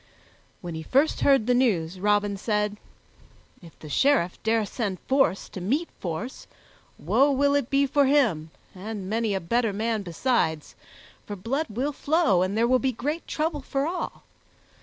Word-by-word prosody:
When 175 -2 -6
he 160 - -5
first 275 - +1
heard 270 -6 +4
the 250 - +2
news, 190 -9 +1
Robin 205 0 +1
said, 210 0 -1 0.8
"If 170 -2 -15
the 155 - -11
Sheriff 225 - +1
dare 220 -1 +1
send 200 -3 -3
force 265 -7 +1
to 185 - -8
meet 280 - -1
force, 185 +9 -5 0.5
woe 275 +2 +3
will 280 +1 +2
it 285 -4 0
be 280 0 +3
for 280 0 +2
him 225 - +2 0.2
and 200 0 -6
many 220 0 0
a - - 0
better 225 +6 0
man 220 +1 -1
besides, 170 - -1 0.5
for 205 - -5
blood 270 +11 -2
will 260 +7 -2
flow 295 - +2
and 190 +3 -1
there 230 +1 +3
will 255 +1 +3
be 265 0 0
great 295 +8 -4
trouble 305 -1 -2
for 275 +1 -2
all. 350 +3 -4
225 Hz, 165 wpm, -25 LUFS, 195-275 Hz, 0.8 s, heard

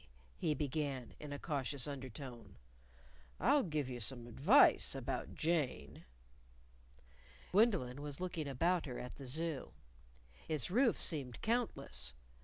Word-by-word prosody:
he 155 - +1
began 140 -3 -2
in 150 -1 -7
a 145 - -3
cautious 140 -3 -2
undertone: 130 -3 -7 0.8
"I'll 290 - +5
give 155 - -1
you 125 -1 -5
some 120 +2 -3
advice 145 - +5
about - - -3
Jane." 150 - -1 1.5
Gwendolyn 180 - +3
was 145 -1 -5
looking 170 -4 -3
about 165 +5 +1
her 125 - -5
at 125 - -7
the 135 - -8
Zoo. 155 +1 -2 0.8
Its 155 -2 0
roofs 240 +2 +3
seemed 135 -7 -1
countless. 140 - 0
145 Hz, 120 wpm, -37 LUFS, 125-165 Hz, 1.5 s, I'll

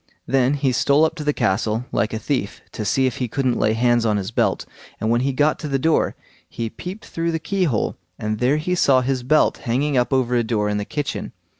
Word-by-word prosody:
Then 135 +1 +2
he 140 -2 +1
stole 140 +5 +3
up 160 - -1
to 155 - -4
the 150 - +2
castle, 110 0 0
like 110 - 0
a 110 - -2
thief, 115 -2 -3
to 110 - -5
see 130 +6 +2
if 130 - -1
he 125 - -1
couldn't 130 0 0
lay 110 - +2
hands 120 0 +2
on 105 -2 +2
his 100 +1 -4
belt; - - 0 0.3
and 110 - 0
when 120 +1 +2
he 135 +1 +1
got 150 +3 +1
to 150 - -5
the 135 -1 0
door, 160 +4 +1 0.3
he 115 -1 -4
peeped 185 +4 -8
through 165 0 -2
the 165 - 0
keyhole, 165 - -1 0.2
and 110 0 -3
there 130 +4 +2
he 170 +4 -1
saw 135 -7 +4
his 130 0 -1
belt 155 +5 +3
hanging 135 +3 0
up 125 +2 +1
over 130 -2 +1
a 120 - +2
door 110 -2 0
in 105 - 0
the 105 - -3
kitchen. 145 +4 -4
130 Hz, 240 wpm, -21 LUFS, 115-145 Hz, 0.3 s, saw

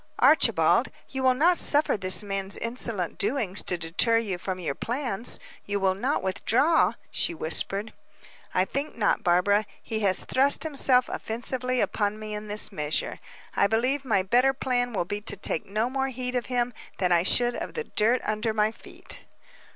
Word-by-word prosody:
"Archibald, - - +4 0.2
you 265 - -4
will 260 -1 +3
not 335 +6 +3
suffer 295 +1 +3
this 185 0 +2
man's 195 -1 -4
insolent 230 -6 -3
doings 210 -3 -1
to 180 - -2
deter 170 +8 +2
you 200 -6 -2
from 185 0 -4
your 160 -6 -2
plans 240 - -1 0.2
you 205 0 -2
will 190 -1 +2
not 190 - -1
withdraw?" 250 - +2 0.2
she 170 - 0
whispered. 195 +7 -1 0.6
"I 185 - +2
think 280 +7 -4
not, 210 - +1
Barbara. 200 +4 +2
He 220 - -4
has 195 -3 +3
thrust 275 +2 +2
himself 270 -5 +2
offensively 250 +2 -1
upon 205 0 -1
me 215 0 -7
in 210 0 -6
this 210 +1 -2
measure; 150 -5 -2 0.4
I - - +3
believe 255 +6 0
my 215 -7 +1
better 250 +7 +3
plan 245 -2 -1
will 195 -6 -1
be 205 +3 -4
to - - -3
take - - -1
no 215 +4 0
more 265 +1 -1
heed 250 -1 -4
of 245 -2 -2
him 245 -1 -1 0.2
than 180 -2 0
I 170 -1 +4
should 240 +6 +3
of - - -6
the 470 - -2
dirt 235 - +1
under 215 +1 -2
my 215 0 +2
feet." - - -14
220 Hz, 175 wpm, -26 LUFS, 195-255 Hz, 0.6 s, Archibald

